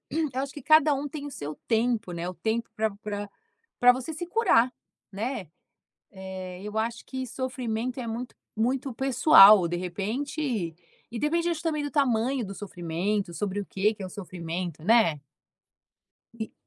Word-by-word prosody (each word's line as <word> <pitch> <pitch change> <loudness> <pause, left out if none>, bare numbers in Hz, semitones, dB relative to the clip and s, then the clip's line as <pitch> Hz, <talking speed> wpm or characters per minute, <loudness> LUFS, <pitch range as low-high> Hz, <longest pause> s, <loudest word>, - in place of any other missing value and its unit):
eu 310 0 0
acho 275 0 -5
que 290 - -9
cada 310 +1 +5
um 280 +1 -3
tem 290 0 -6
o - - -6
seu 150 - -6
tempo, 225 -4 +1
né, 170 +1 -4
o 185 - -5
tempo 220 +7 -2
pra 220 -1 +1
pra 205 -1 -5 0.5
pra 245 0 +8
você 260 +5 -5
se 350 +3 -5
curar, 345 - +3 0.4
né? 215 - -3 0.6
Eh, 190 -1 -7
eu 210 +1 -6
acho 230 +1 -2
que 260 0 -4
sofrimento 250 -1 -3
é 240 - -5
muito, 230 +2 -5 0.2
muito 255 +4 0
pessoal. 225 - +7
De 175 - -2
repente 210 - -3 0.4
e 235 - -5
depende, 335 +6 +1
acho 325 -2 -3
também, 305 -3 -1
do 290 - -3
tamanho 255 -3 +1
do 195 - -7
sofrimento, 190 0 -2
sobre 205 +1 -2
o 200 - -6
que 210 +3 +1
que 205 - -9
é - - -4
o - - -10
sofrimento, 175 -4 -5
né? 205 -8 +4 1.2
E 220 - -4
225 Hz, 170 wpm, -27 LUFS, 190-265 Hz, 1.2 s, pra